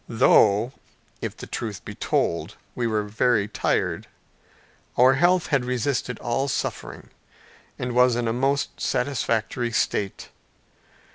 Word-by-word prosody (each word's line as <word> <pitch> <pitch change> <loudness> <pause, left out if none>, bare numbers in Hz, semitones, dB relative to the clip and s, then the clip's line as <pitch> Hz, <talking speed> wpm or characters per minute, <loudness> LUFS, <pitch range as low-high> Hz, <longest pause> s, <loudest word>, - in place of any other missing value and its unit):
Though, 110 +1 +4 0.5
if - - -4
the - - -8
truth 110 -5 -5
be - - -6
told, - - -1 0.2
we 120 -1 -1
were 110 -2 0
very 110 0 +1
tired, 105 - -1 0.9
our 130 +2 +6
health 175 +5 +3
had 135 -2 +3
resisted 125 -1 -1
all 130 +3 -1
suffering, 135 - -4 0.7
and 125 0 -3
was 125 0 +4
in 120 -1 -1
a 115 - 0
most 135 +3 -1
satisfactory 120 -2 -1
state. 100 -3 -1
120 Hz, 125 wpm, -24 LUFS, 110-130 Hz, 0.9 s, our